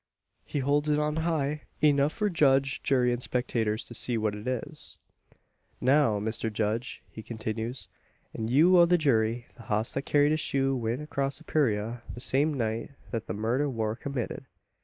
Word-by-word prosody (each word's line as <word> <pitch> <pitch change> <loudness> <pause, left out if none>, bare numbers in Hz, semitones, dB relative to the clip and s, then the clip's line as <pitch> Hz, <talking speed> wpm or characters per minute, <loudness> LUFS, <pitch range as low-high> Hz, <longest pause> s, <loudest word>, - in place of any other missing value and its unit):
He - - -5
holds 145 +3 +1
it 150 - +3
on 150 +1 0
high 150 -3 0 0.2
enough 145 -1 +4
for 210 - -1
judge, 140 -6 +2
jury, 125 -2 +2
and 120 - -3
spectators 115 -4 -1
to - - -11
see 120 0 -2
what 110 -1 0
it 105 +3 -7
is. 125 -2 -4 0.8
"Now, 130 -5 +3
Mr 110 +1 -2
Judge," 110 0 -2
he 110 - -8
continues, 110 +2 -4 0.5
"an' 110 - -3
you 165 +9 +6
o' 170 - +8
the 175 +1 +4
jury, 120 -6 +1
the 115 - -12
hoss 110 +1 0
that 135 +2 -3
carried 145 0 +4
this 155 - +1
shoe 135 -2 +1
went 120 +3 -2
acrosst 140 -1 -2
the 160 - -14
purayra 115 -6 0
the - - -8
same 140 +5 +1
night 115 0 -2 0.2
thet 115 -3 -3
the - - -3
murder 120 +7 0
war 110 -3 -1
committed. 130 0 -4
130 Hz, 180 wpm, -28 LUFS, 110-145 Hz, 0.8 s, o